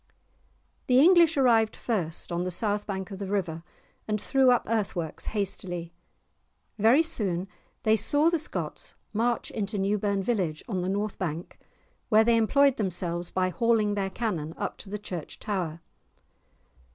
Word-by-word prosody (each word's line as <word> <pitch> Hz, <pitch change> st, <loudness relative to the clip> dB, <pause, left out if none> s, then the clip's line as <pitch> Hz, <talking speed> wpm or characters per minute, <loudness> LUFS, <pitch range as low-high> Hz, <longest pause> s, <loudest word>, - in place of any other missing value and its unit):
The 250 Hz, 0 st, +5 dB
English 335 Hz, 0 st, +6 dB
arrived 230 Hz, -5 st, +4 dB
first, 175 Hz, -8 st, -2 dB
on 170 Hz, +1 st, -1 dB
the 185 Hz, -, -2 dB
south 205 Hz, +3 st, 0 dB
bank 190 Hz, -1 st, -4 dB
of 195 Hz, -, -7 dB
the 200 Hz, -, -4 dB
river, 180 Hz, -5 st, -2 dB, 0.5 s
and 210 Hz, -1 st, 0 dB
threw 265 Hz, +4 st, +3 dB
up 245 Hz, -1 st, +4 dB
earth 215 Hz, -3 st, -1 dB
works 165 Hz, -3 st, -4 dB
hastily. 180 Hz, -4 st, -3 dB, 0.9 s
Very 235 Hz, +9 st, +5 dB
soon 195 Hz, -, 0 dB, 0.4 s
they 220 Hz, 0 st, +4 dB
saw 290 Hz, +10 st, +3 dB
the 335 Hz, -, +1 dB
Scots 310 Hz, -, -5 dB, 0.2 s
march 235 Hz, +2 st, 0 dB
into 205 Hz, -1 st, -3 dB
Newburn 200 Hz, 0 st, 0 dB
village, 185 Hz, -9 st, -1 dB
on 195 Hz, -6 st, -2 dB
the 180 Hz, +1 st, -2 dB
north 205 Hz, +1 st, -2 dB
bank, 170 Hz, -1 st, -4 dB, 0.5 s
where 220 Hz, 0 st, +6 dB
they 230 Hz, 0 st, +4 dB
employed 275 Hz, +4 st, +3 dB
themselves 175 Hz, -3 st, -2 dB
by 185 Hz, 0 st, 0 dB
hauling 215 Hz, +2 st, +2 dB
their 195 Hz, -1 st, -1 dB
cannon 180 Hz, -8 st, -3 dB
up -, -, -3 dB
to 195 Hz, -, -10 dB
the 210 Hz, -, -3 dB
church 180 Hz, -6 st, -7 dB
tower. 175 Hz, -6 st, -3 dB
205 Hz, 155 wpm, -27 LUFS, 180-230 Hz, 0.9 s, English